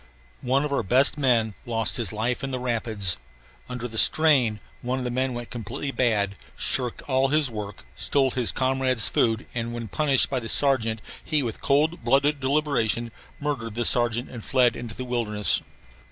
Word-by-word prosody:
One 135 +3 +1
of 145 - -3
our - - +1
best 130 +7 +4
men 120 -7 +2
lost 115 0 +1
his 115 -6 -2
life 115 +5 -2
in 135 - -2
the 130 - -3
rapids. 110 - +1 0.5
Under 125 -1 -4
the 110 -2 -2
strain 135 -9 +3 0.2
one 125 +2 -2
of 130 - -3
the 125 - -2
men 130 0 -1
went 120 -1 -7
completely 120 +5 -5
bad, 105 -7 0 0.2
shirked 125 -3 -1
all 135 -1 +1
his 145 -2 +2
work, 105 -3 -7
stole 135 -2 +1
his 125 -2 +1
comrades' 130 -3 +1
food 115 0 +1
and 115 -1 -3
when 120 -1 -5
punished 140 +2 +3
by 135 - -1
the 115 -2 -6
sergeant 115 -6 +2 0.2
he 155 -3 +1
with 115 -3 -5
cold 150 +1 +1
blooded 140 +4 +2
deliberation 130 -5 0 0.3
murdered 125 -7 -3
the 120 0 -1
sergeant 120 0 +1
and 120 -3 -8
fled 125 -2 +3
into 115 -2 -7
the 130 - -6
wilderness. 110 -4 -1
125 Hz, 180 wpm, -25 LUFS, 115-135 Hz, 0.5 s, best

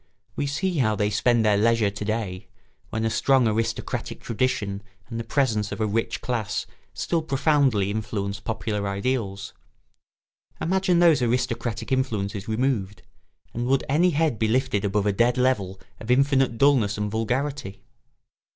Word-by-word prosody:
We 140 - -1
see 165 +4 -1
how 110 -4 +2
they 105 0 0
spend 115 +2 +2
their 105 -1 +4
leisure 115 -2 +3
to 105 +1 -6
day, 105 -4 -3 0.4
when 110 0 -2
a - - +2
strong 130 -1 +3
aristocratic 115 +1 -2
tradition 105 -4 -1 0.3
and 115 -1 -5
the - - -3
presence 115 -5 0
of - - -5
a 110 - +1
rich 115 +2 -1
class 110 -4 -2 0.3
still 170 -2 -1
profoundly 135 -8 +2
influence 105 -2 -3
popular 105 0 -3
ideals. 100 -1 -2 1.1
Imagine 185 +1 +1
those 165 -6 +5
aristocratic 115 -1 -1
influences 110 -5 -1
removed, 110 -4 -1 0.5
and 120 +1 -2
would 135 +1 +2
any 160 +6 +3
head 155 -7 0
be 110 - +2
lifted 120 -3 +1
above 100 0 0
a 105 - +2
dead 120 +4 +2
level 105 -8 0 0.2
of 110 - -9
infinite 135 -2 +3
dulness 120 -7 +3
and 105 0 -2
vulgarity? 120 -1 -2
115 Hz, 150 wpm, -24 LUFS, 105-130 Hz, 1.1 s, those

